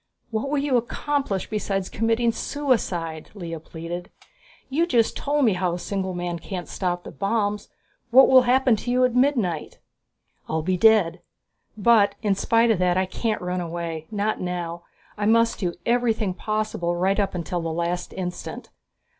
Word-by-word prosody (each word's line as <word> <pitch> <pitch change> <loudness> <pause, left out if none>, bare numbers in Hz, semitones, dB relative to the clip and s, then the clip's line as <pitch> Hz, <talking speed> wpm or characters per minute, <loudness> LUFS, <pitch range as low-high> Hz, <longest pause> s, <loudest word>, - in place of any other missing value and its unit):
"What 225 +5 -2
will 295 - 0
you 280 -2 +2
accomplish 240 -3 -2
besides 195 -3 -2
committing 230 +1 +1
suicide?" 190 - -2
Lea 165 -4 -6
pleaded. 165 +3 -7 0.6
"You 315 +6 +1
just 235 -8 +2
told 290 -1 +1
me 220 - +4
how 180 -1 0
a - - -2
single 190 0 -3
man 175 -1 -3
can't 180 +1 -6
stop 175 -2 -2
the - - -9
bombs. 205 0 -1 0.4
What 260 +3 +8
will 260 -1 +7
happen 250 -1 +3
to 245 - -5
you 250 +1 +4
at 250 - 0
midnight?" 240 - +1 0.7
"I'll 160 0 -1
be 185 +3 +1
dead 185 -4 +4 0.6
but 205 -2 +4
in 205 -2 +3
spite 230 +4 +3
of 210 - +1
that 180 0 +2
I 190 - +2
can't 215 +1 -2
run 180 0 -2
away. 165 -2 -5
Not 210 0 -1
now. 175 -1 -4 0.4
I 205 - +1
must 230 +1 +3
do 175 -4 -2
everything 230 -5 +1
possible 215 -4 -2
right 190 +4 +1
up 200 -2 0
until 175 0 -2
the 165 - -3
last 170 +2 -2
instant. 180 -1 -6
200 Hz, 165 wpm, -24 LUFS, 175-230 Hz, 0.7 s, What